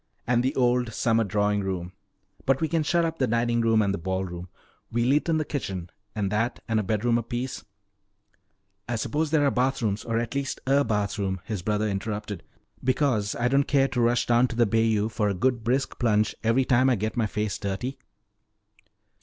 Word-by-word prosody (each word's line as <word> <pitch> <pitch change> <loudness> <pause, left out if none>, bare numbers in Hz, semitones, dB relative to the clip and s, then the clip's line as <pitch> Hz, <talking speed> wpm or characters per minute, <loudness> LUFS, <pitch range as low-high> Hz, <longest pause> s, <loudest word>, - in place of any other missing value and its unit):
"And 120 0 +2
the 130 +4 -1
old 125 -2 +2
summer 115 -1 +2
drawing 105 0 +1
room. 90 -2 -4 0.5
But 135 0 +3
we 160 - +1
can 165 0 +1
shut 170 +2 +2
up 165 0 -3
the 130 - +2
dining 120 +1 +1
room 115 -1 +3
and 100 -1 0
the 100 - -3
ball 95 +2 -2
room. 90 0 -7 0.4
We'll 120 +3 +2
eat 150 +3 +1
in 160 - +3
the 155 - -1
kitchen, 95 - -4 0.2
and 100 -2 -1
that 115 +3 0
and 115 -1 +1
a - - 0
bedroom 115 +4 +1
apiece 120 +2 -4 0.6
" 100 0 -35
"I 120 - 0
suppose 150 +7 -1
there 150 -2 +3
are 140 - +3
bathrooms, 125 -5 0
or 115 -1 -1
at 115 +1 -2
least 140 -1 -2
a 140 +2 +3
bathroom," 100 -3 -1
his 105 -5 -4
brother 105 +3 0
interrupted. 105 -1 -4 0.4
"Because 125 -6 +1
I 120 - +1
don't 140 +2 +2
care 135 -1 +3
to 125 - -1
rush 120 +1 +2
down 120 +1 +4
to 120 - -6
the 120 0 +4
bayou 110 -1 +2
for 105 -1 0
a 100 - -1
good 120 +3 0
brisk 130 +4 -1
plunge 110 -3 +2
every 115 +4 +3
time 130 +1 +4
I 130 - +3
get 110 +1 -3
my 115 -3 +1
face 105 0 -2
dirty." 100 +7 -4
115 Hz, 205 wpm, -26 LUFS, 105-130 Hz, 0.6 s, down